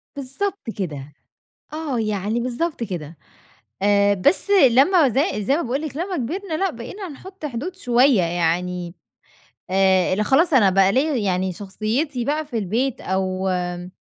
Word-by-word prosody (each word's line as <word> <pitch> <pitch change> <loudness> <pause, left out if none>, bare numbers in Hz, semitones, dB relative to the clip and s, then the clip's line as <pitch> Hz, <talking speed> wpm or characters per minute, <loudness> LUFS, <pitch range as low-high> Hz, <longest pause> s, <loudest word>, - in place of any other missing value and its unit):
بالضبط 285 - -4
كده. 150 -7 -5 0.6
آه، 300 -6 -2
يعني 215 +1 -1
بالضبط 255 +4 -2
كده. 170 -7 -6 0.7
آآ 200 0 +4
بس 200 - +1
لمّا 295 -1 +5
زي 250 - 0
زي 275 +8 +2
ما 340 - -1
باقول 265 +3 -2
لِك 305 -3 -6
لمّا 360 +3 -3
كبرنا 325 +7 -3
لأ، 385 +4 0
بقينا 320 - -8
نحط 370 +4 -11
حدود 295 +8 -5
شوية 250 - +3
يعني 175 +1 -1 0.8
آآ 190 -1 +3
ل 215 - 0
خلاص 315 - +3
أنا 220 -7 +6
بقى 195 +1 +4
ليّا 290 +7 +1
يعني 190 -4 0
شخصيتي 225 - -2
بقى 305 +3 -1
في 265 -6 -4
البيت 225 +6 -1
أو 190 0 -1
آمم، 180 -1 -3
235 Hz, 150 wpm, -22 LUFS, 190-295 Hz, 0.8 s, أنا